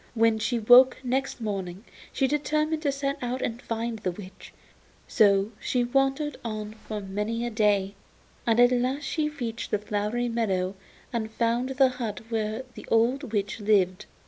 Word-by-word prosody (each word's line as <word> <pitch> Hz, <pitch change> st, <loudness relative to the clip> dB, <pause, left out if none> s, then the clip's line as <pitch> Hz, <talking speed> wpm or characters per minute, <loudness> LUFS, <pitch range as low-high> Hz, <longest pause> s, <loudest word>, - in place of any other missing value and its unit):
When 225 Hz, -1 st, +3 dB
she 240 Hz, +3 st, 0 dB
awoke 245 Hz, +3 st, +7 dB
next 260 Hz, +2 st, -1 dB
morning 195 Hz, -1 st, -4 dB, 0.3 s
she 270 Hz, -, +1 dB
determined 305 Hz, +2 st, 0 dB
to 290 Hz, -3 st, +1 dB
set 275 Hz, +1 st, -2 dB
out 250 Hz, +1 st, -2 dB
and 235 Hz, +1 st, -3 dB
find 230 Hz, 0 st, -3 dB
the 185 Hz, -, -1 dB
witch; 185 Hz, +1 st, -10 dB, 0.6 s
so 200 Hz, -2 st, +3 dB
she 250 Hz, -1 st, 0 dB
wandered 270 Hz, +3 st, 0 dB
on 215 Hz, -2 st, -5 dB
for 215 Hz, -1 st, -7 dB
many 210 Hz, +4 st, -3 dB
a 240 Hz, -, -3 dB
day, 205 Hz, -3 st, +2 dB, 0.5 s
and 230 Hz, 0 st, +3 dB
at 245 Hz, 0 st, +7 dB
last 255 Hz, +4 st, 0 dB
she 300 Hz, +2 st, -1 dB
reached 240 Hz, -6 st, -5 dB
the -, -, +1 dB
flowery 210 Hz, +3 st, -2 dB
meadow 195 Hz, -6 st, 0 dB, 0.4 s
and 220 Hz, -2 st, -2 dB
found 235 Hz, +3 st, 0 dB
the 265 Hz, 0 st, +4 dB
hut 235 Hz, -6 st, -4 dB
where 220 Hz, +1 st, -2 dB
the -, -, -11 dB
old 240 Hz, +3 st, +2 dB
witch 205 Hz, 0 st, -2 dB
lived. 195 Hz, -3 st, +2 dB
230 Hz, 165 wpm, -26 LUFS, 210-255 Hz, 0.6 s, awoke